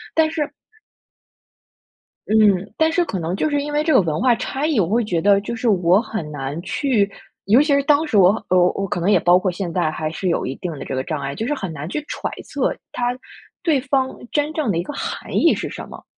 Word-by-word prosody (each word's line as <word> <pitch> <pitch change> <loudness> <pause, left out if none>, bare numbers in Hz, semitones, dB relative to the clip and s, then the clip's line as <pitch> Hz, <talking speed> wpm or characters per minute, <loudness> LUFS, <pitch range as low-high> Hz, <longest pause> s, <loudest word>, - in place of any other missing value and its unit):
但 315 -1 +3
是 300 -2 -2 1.8
嗯， 205 -3 +3
但 320 0 +3
是 345 +1 +1
可 190 - -3
能 170 +2 -2
就 310 - 0
是 290 -1 0
因 295 +1 -4
为 300 +1 +1
这 315 - +2
个 - - +6
文 160 -3 -2
化 245 0 +4
差 270 +6 -3
异， 300 -8 +1
我 170 - +2
会 230 +2 +2
觉 175 -6 -1
得 200 0 +5
就 235 +3 -5
是 230 +1 0
我 185 0 +4
很 205 -11 -5
难 145 +2 -4
去 215 -4 +1 0.4
尤 225 +8 +5
其 300 - +1
是 280 0 +3
当 295 +2 +3
时 215 - +1
我 185 -1 +7 0.2
呃， 185 - +4 0.2
我 195 0 -3
可 175 - -2
能 180 +4 +1
也 - - +5
包 175 +1 +5
括 185 -1 0
现 175 -1 -4
在 170 -4 0
还 155 0 -3
是 185 +4 -4
有 - - 0
一 135 - -4
定 180 - -5
的 135 - -7
这 135 - -4
个 130 - -1
障 150 -2 -4
碍， 140 0 -4
就 225 - -3
是 295 - 0
很 195 - -4
难 150 0 -6
去 300 +10 -4
揣 - - -4
测 - - -1 0.2
他 245 0 -1 0.5
对 315 -6 +2
方 265 -1 0 0.2
真 295 +1 0
正 300 -10 0
的 165 - -1
一 - - -1
个 - - -6
含 - - -5
义 - - +5
是 - - -4
什 - - -8
么， - - -11
205 Hz, 265 characters per minute, -21 LUFS, 175-280 Hz, 1.8 s, 我